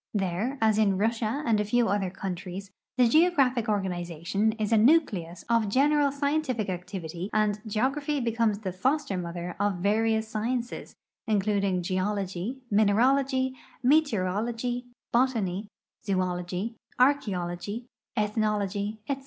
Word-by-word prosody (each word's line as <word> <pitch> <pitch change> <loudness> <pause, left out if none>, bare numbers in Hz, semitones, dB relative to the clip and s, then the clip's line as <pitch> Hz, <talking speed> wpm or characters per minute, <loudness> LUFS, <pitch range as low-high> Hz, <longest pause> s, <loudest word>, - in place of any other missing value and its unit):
There, 200 +7 -1
as 220 -1 +3
in 200 -3 +3
Russia 225 +6 0
and 225 -2 +3
a - - +2
few 235 +3 +2
other 195 -1 0
countries, 190 0 -6 0.3
the 250 -1 +5
geographic 270 -6 +3
organization 185 +1 -1
is 215 -1 -3
a 225 - +5
nucleus 210 - +2
of 230 -3 +2
general 285 +4 +3
scientific 280 -6 -1
activity, 180 -1 -5
and 210 -1 +1
geography 275 +7 0
becomes 230 -3 +1
tbe 195 -3 -5
foster 265 +3 0
mother 175 0 -4
of 205 -1 +1
various 220 +4 +1
sciences, 235 +3 -3 0.3
including 200 -3 +1
geology, 190 +4 -2
mineralogy, 260 +6 +3 0.3
meteorology, 240 -2 +1 0.3
botany, 220 -6 +1 0.4
zoology, 185 +2 -2 0.3
archeology, 205 -5 0 0.3
ethnology, 210 -1 0
etc. 275 -1 -1
215 Hz, 115 wpm, -27 LUFS, 190-245 Hz, 0.4 s, the